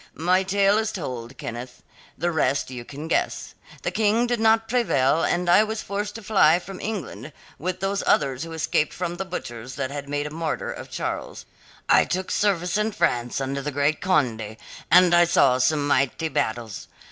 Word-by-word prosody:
"My 180 +4 +2
tale 200 +2 +2
is 220 -1 -1
told, 125 - -6
Kenneth. 120 +2 -7 0.3
The 175 - 0
rest 140 -4 0
you 125 -2 -6
can 145 +5 -8
guess. - - -1 0.3
The - - -1
King 220 +2 +2
did 240 -1 -1
not 225 0 +3
prevail 165 - +2
and 175 0 0
I 175 +5 +6
was 220 0 -4
forced 205 +1 -4
to 225 - -8
fly 190 -6 +4
from 185 +1 -8
England 155 - -5 0.3
with 185 +3 -3
those 195 +1 0
others 135 -2 +2
who 165 - -6
escaped 155 -1 0
from 175 -1 -3
the 195 - -3
butchers 125 -9 -7
that 135 -2 -3
had 140 0 -6
made 145 0 -2
a 150 - -5
martyr 160 0 -3
of - - -8
Charles. - - -5 0.4
I - - +5
took 185 +1 -3
service 185 -2 +1
in 215 0 0
France 125 -10 0
under 135 +1 -2
the 145 - -3
great 145 +2 0
Conde, 115 - 0 0.3
and 180 -1 +6
I 175 0 +6
saw 135 -6 +3
some 145 +3 +2
mighty 145 +3 +1
battles. 110 -5 -3
165 Hz, 185 wpm, -24 LUFS, 135-195 Hz, 0.4 s, I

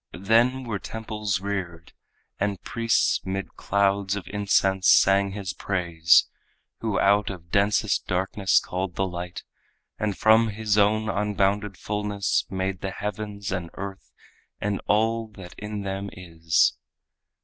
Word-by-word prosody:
Then 120 +6 +3
were 110 -5 -3
temples 105 -3 -3
reared, 90 -5 -5 0.5
And 100 -1 -1
priests 115 -1 +1
'mid 95 +1 -4
clouds 100 0 +1
of 100 - -6
incense 95 -2 +2
sang 100 0 +5
His 100 -3 -4
praise 85 -4 +3 0.5
Who 110 -3 -1
out 100 +1 +3
of 85 -3 -9
densest 100 +1 +2
darkness 95 +1 +2
called 90 0 -4
the 95 - 0
light, 90 -1 -6 0.6
And 105 -3 -1
from 110 +1 +5
His 105 -1 -1
own 105 +1 +3
unbounded 105 -1 0
fullness 105 -1 -1
made 95 -1 -3
The 95 - -2
heavens 105 0 -5
and 90 -2 -3
earth 100 0 -7 0.5
and 100 -1 -2
all 115 +2 +1
that 90 -2 -10
in 105 -1 -5
them 95 +1 -4
is. 80 -3 +1
100 Hz, 130 wpm, -25 LUFS, 95-105 Hz, 0.6 s, sang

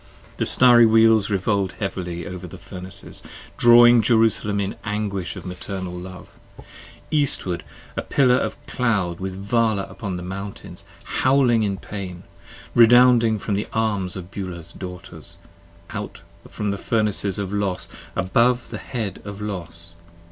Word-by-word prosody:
The - - +2
Starry 120 -2 +7
Wheels 110 -2 +4
revolv'd 100 -1 0
heavily 90 -4 -5
over 90 -1 -7
the - - -11
Furnaces: 90 +1 -7 0.3
Drawing 120 0 +7
Jerusalem 110 -2 +2
in 100 -1 -3
anguish 105 -3 -3
of - - -9
maternal 90 0 -6
love, 90 +1 -10 0.7
Eastward, 140 - +4 0.3
a - - -2
pillar 130 -3 +2
of - - -2
a - - -11
cloud 100 -9 0
with 95 0 -5
Vala 105 +1 0
upon 100 -3 -6
the 90 - -7
mountains 100 +2 -8 0.2
Howling 130 -3 +2
in 100 -2 -1
pain, 95 -3 -8 0.5
redounding 120 -1 +6
from 105 - -4
the 100 +2 -2
arms 105 -5 -1
of 90 -1 -8
Beulah's 90 -4 -7
Daughters, 90 -1 -9 0.5
50 - - -6
Out - - -8 0.3
from 105 -1 -3
the 100 - -4
Furnaces 105 -4 0
of 100 -1 -4
Los 100 -3 -2 0.3
above 115 +6 +1
the - - -5
head 110 -6 -5
of 100 0 -8
Los. 85 -5 -7
100 Hz, 140 wpm, -22 LUFS, 95-115 Hz, 0.7 s, Starry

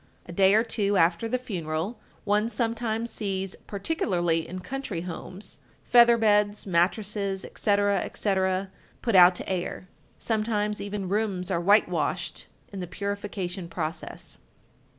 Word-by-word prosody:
A - - -9
day 190 +3 +4
or 220 - +5
two 205 -3 0
after 170 +6 +3
the 250 +3 0
funeral 180 -3 -4 0.2
one 210 +2 +1
sometimes 230 0 -1
sees, 195 -3 -3
particularly 180 - 0
in 185 - -6
country 200 -2 -4
homes, 185 +3 -7 0.2
feather 235 -1 +6
beds, 210 -2 +2
mattresses, 195 +2 0
etc., 205 -1 +1
etc., 190 -1 -1 0.3
put 230 - 0
out 180 0 +8
to - - -6
air. 185 0 -3 0.3
Sometimes 210 -2 -1
even 200 -1 -4
rooms 195 -2 -1
are 170 - +1
whitewashed 175 -4 +1 0.3
in 195 - -5
the 180 - -4
purification 200 -2 -4
process. 165 -1 -5
200 Hz, 130 wpm, -27 LUFS, 180-215 Hz, 0.3 s, out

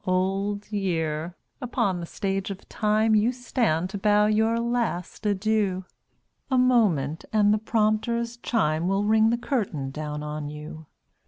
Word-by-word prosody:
Old 195 +3 -1
Year! 170 -4 -2 0.3
upon 200 -7 0
the 170 - -6
Stage 195 +1 -2
of 195 0 -8
Time 215 +1 +1
You 215 +3 +4
stand 230 - -1
to 200 - -4
bow 210 +1 +4
your 220 +2 +2
last 235 -5 -2
adieu; 200 -2 0 0.6
A 260 - +2
moment, 200 - +2
and 210 -1 +4
the 215 - +1
prompter's 230 +2 0
chime 170 -9 0
Will 195 +2 +1
ring 220 +1 +4
the 235 - +1
curtain 195 - -2
down 150 0 -5
on 150 -1 -4
you. 150 +1 -9
205 Hz, 145 wpm, -25 LUFS, 170-220 Hz, 0.6 s, You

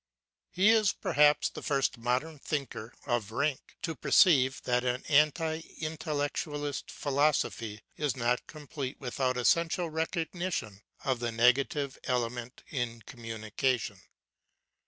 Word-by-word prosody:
He 190 +4 +4
is 220 -2 +5
perhaps 150 0 +3
the - - -8
first 135 -3 0
modern 130 +6 -1
thinker 135 -6 -4
of 120 -4 0
rank 140 +4 -2
to 165 - -1
perceive 135 -7 +4
that 125 0 +1
an 125 0 -1
anti 155 +2 +3 0.2
intellectualist 145 -2 -3
philosophy 135 -7 0 0.2
is 145 -4 -1
not 120 0 0
complete 145 -3 -6
without 130 -1 -1
essential 170 +6 +2
recognition 160 - -2 0.2
of 130 -3 +1
the 120 0 -1
nega 125 +4 +4
tive 140 -2 -4
element 125 -1 -2
in 120 -4 -3
communication. 115 +1 -2
135 Hz, 115 wpm, -30 LUFS, 120-155 Hz, 0.2 s, is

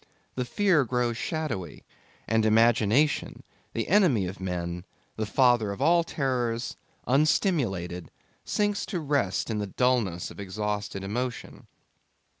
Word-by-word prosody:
The 125 - -2
fear 180 +1 +3
grows 125 -1 0
shadowy; 145 - -4 0.4
and 110 0 +2
Imagination, 115 +5 +3 0.3
the 115 - -2
enemy 170 - +4
of 90 +1 -6
men, 90 -2 -4 0.3
the 110 -1 -3
father 120 -3 +3
of 100 - -6
all 170 +4 +4
terrors, 125 -6 -2 0.3
unstimulated, 125 - +1 0.3
sinks 205 -1 0
to 180 - -2
rest 140 - 0
in 105 - -1
the 105 - -2
dullness 110 -6 0
of - - -12
exhausted 105 0 -3
emotion. 120 +5 -4
120 Hz, 120 wpm, -27 LUFS, 100-140 Hz, 0.4 s, enemy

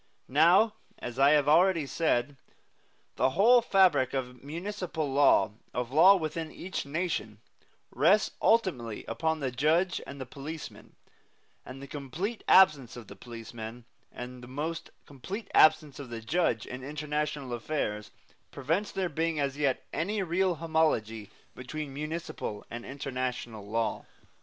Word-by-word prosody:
Now, 175 - +5 0.2
as 125 +1 -7
I 140 +1 +6
have 145 -2 +3
already 165 +1 +4
said, 140 -3 0 0.8
the - - +3
whole 240 +5 +6
fabric 180 - +3
of 125 -1 -5
municipal 170 0 -4
law, 135 -9 +4 0.2
of 125 0 -2
law 175 +7 +7
within 160 -2 -3
each 185 -5 -5
nation, 145 - -3 0.5
rests 210 +2 +3
ultimately 135 - +1
upon 160 +6 -2
the 130 -2 -1
judge 160 +8 +1
and 140 0 -8
the 130 - -5
policeman; 145 +5 -9 0.7
and 135 +2 -10
the - - -8
complete 155 - -5
absence 145 -10 +5
of 115 -4 -11
the 100 - -10
policeman, 115 +1 -9 0.3
and 125 0 -8
the - - -10
almost 155 +6 -4 0.2
complete 185 - -8
absence 155 -2 +4
of 135 -3 -8
the 115 -1 -5
judge, 115 - 0
in 125 0 -8
international 150 -2 -3
affairs, 110 -4 -3 0.4
prevents 165 +9 -2
there 190 -1 -1
being 165 0 -1
as 140 -1 -1
yet 140 -3 0
any 200 +5 -1
real 180 +1 +1
homology 155 -10 0 0.2
between 140 +3 -6
municipal 150 -7 -5
and 120 +1 -7
international 125 -5 -4
law. 115 +1 -1
145 Hz, 140 wpm, -29 LUFS, 125-165 Hz, 0.8 s, law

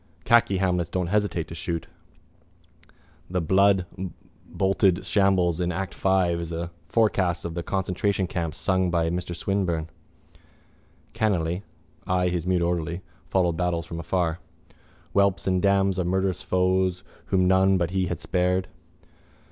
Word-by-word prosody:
Khaki 115 -5 +4
Hamlets 90 -3 0
don't 90 -1 -2
hesitate 105 -6 0
to - - -7
shoot. 85 +1 -4 1.4
The 90 0 0
bloodboltered 95 +1 0
shambles 95 -5 +2
in 90 0 0
act 95 +2 -3
five 95 -3 +1
is 85 -1 -5
a 85 +1 -4 0.2
forecast 95 -7 +1
of 85 - -4
the 85 - -3
concentration 95 +2 -1
camp 85 -3 -3
sung 95 -1 +1
by 85 -1 +1
Mr 90 0 -3
Swinburne. 85 -4 -1 1.2
Cranly, 90 -4 0 0.5
I 90 0 +2
his 90 -1 -2
mute 90 -2 +2
orderly, 85 +1 -2 0.3
following 90 -3 +2
battles 85 -1 -1
from 85 0 -6
afar. 85 0 -1 0.7
Whelps 100 -1 +2
and 95 -1 +1
dams 100 -1 +2
of 90 - 0
murderous 95 0 0
foes 95 0 +1 0.2
whom 95 -1 +2
none 95 +1 +4
But 85 -1 -1
we 95 -1 0
had 90 -2 -3
spared... 90 0 0
90 Hz, 135 wpm, -25 LUFS, 85-95 Hz, 1.4 s, Khaki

